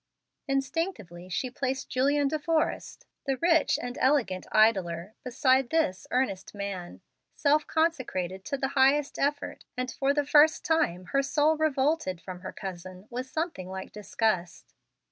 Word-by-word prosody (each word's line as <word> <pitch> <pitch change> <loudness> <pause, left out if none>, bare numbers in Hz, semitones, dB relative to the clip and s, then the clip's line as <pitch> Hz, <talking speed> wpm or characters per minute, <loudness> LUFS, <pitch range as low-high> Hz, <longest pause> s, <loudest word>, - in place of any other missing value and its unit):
Instinctively 270 - -3
she 245 +7 -2
placed 265 +1 -3
Julian 280 +3 +2
De 310 +2 -1
Forrest, 315 +1 -1 0.2
the 270 -1 +1
rich 335 +1 +3
and 245 0 -5
elegant 255 -9 +1
idler, 190 -4 +2
beside 260 0 +2
this 315 - 0
earnest 210 -7 -1
man, 195 -3 -6 0.3
self 300 +1 +2
consecrated 240 - -1
to 280 - -2
the 265 0 -1
highest 275 +1 +2
effort, 285 +1 -1
and 255 0 -2
for 275 0 +1
the 290 0 +1
first 300 +2 +5
time 310 - +1
her 275 - +4
soul 300 +3 +2
revolted 295 - 0
from 185 0 -8
her - - -7
cousin 185 0 -8
with 250 +2 -4
something 315 - -3
like 190 0 -6
disgust. 210 -3 -2
260 Hz, 145 wpm, -28 LUFS, 190-295 Hz, 0.3 s, first